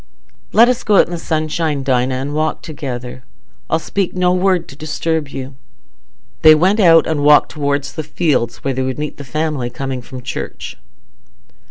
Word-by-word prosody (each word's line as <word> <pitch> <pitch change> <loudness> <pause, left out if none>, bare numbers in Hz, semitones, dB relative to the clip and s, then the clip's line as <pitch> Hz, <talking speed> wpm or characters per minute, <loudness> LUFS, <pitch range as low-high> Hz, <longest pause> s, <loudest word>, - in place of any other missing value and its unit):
"Let 230 +2 +6
us 250 0 0
go 210 - +2
out - - +8
into - - -3
the 175 - -3
sunshine, 155 -2 -1
Dinah, 130 -1 +1
and 135 +3 -4
walk 155 +1 -1
together. 130 -5 -6 0.5
I'll - - +2
speak 185 +4 -2
no 180 0 +2
word 185 -1 +1
to 135 - -11
disturb 155 +1 -2
you." 135 0 -7 0.9
They 155 0 +8
went 190 +7 +2
out 165 -5 +6
and 155 -2 -1
walked 150 0 +5
towards 145 -2 -2
the 160 - -4
fields, 150 -6 -1
where 135 - -1
they 130 - -2
would 130 0 -2
meet 150 0 -5
the 145 - -8
family 150 -2 -2
coming 130 +1 -5
from 125 0 -10
church. - - -6
150 Hz, 180 wpm, -17 LUFS, 135-165 Hz, 0.9 s, out